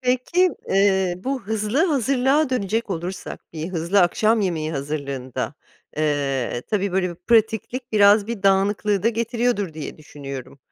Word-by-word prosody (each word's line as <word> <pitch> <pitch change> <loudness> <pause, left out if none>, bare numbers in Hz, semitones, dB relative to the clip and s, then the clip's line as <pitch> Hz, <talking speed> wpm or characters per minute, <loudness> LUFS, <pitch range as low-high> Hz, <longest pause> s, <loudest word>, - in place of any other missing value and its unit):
Peki, 255 +9 +2 0.2
eee, 190 -2 +3
bu 260 +4 -3
hızlı 220 - 0
hazırlığa 275 - +2
dönecek 225 -2 -1
olursak, 180 +2 -5
bir 160 +2 -5
hızlı 175 +3 +1
akşam 215 +5 +3
yemeği 165 -5 -1
hazırlığında, 140 -3 -4 0.4
eee, 140 -5 -1
tabii 200 -3 0
böyle 185 -1 +1
bir - - -7
pratiklik 225 +5 0
biraz 205 0 +5
bir 230 -4 -5
dağınıklığı 200 0 +2
da 230 - +4
getiriyordur 230 -5 -1
diye 155 0 -7
düşünüyorum. 140 -3 -9
200 Hz, 135 wpm, -22 LUFS, 160-230 Hz, 0.4 s, biraz